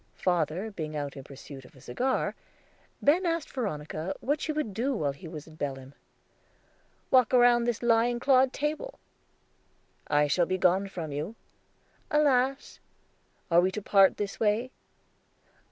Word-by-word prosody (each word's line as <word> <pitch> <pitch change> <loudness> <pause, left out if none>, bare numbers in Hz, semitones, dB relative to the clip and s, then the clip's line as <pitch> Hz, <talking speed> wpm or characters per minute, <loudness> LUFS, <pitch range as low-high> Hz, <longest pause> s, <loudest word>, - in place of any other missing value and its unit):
Father 175 +4 -1
being 155 -6 -5
out 145 -2 -4
in 135 - -8
pursuit 135 0 -11
of 125 - -18
a - - -16
cigar, 255 - -1 0.7
Ben 320 +6 +4
asked 335 -3 -1
Veronica 165 - -4
what 290 +3 -1
she 315 - -1
would 300 -9 -3
do 255 +6 -1
while 145 -9 0
he 150 +5 -11
was 155 -2 -8
in 160 - -15
Belem. 135 -3 -5 1.2
"Walk 255 -4 +5
round 240 -1 +5
this 240 0 -1
lion 240 +1 +3
clawed 260 0 +4
table." 310 - -3 1.1
"I 145 0 +3
shall 170 +4 +1
be 185 - 0
gone 185 +2 +2
from 170 -5 -6
you." 155 +10 -4 0.7
"Alas!" 275 -3 +1 0.7
"Are 170 +1 +6
we 185 - +2
to 210 +3 -5
part 195 -2 +5
this 205 -1 -4
way?" 225 +4 +1
200 Hz, 150 wpm, -28 LUFS, 155-255 Hz, 1.2 s, Are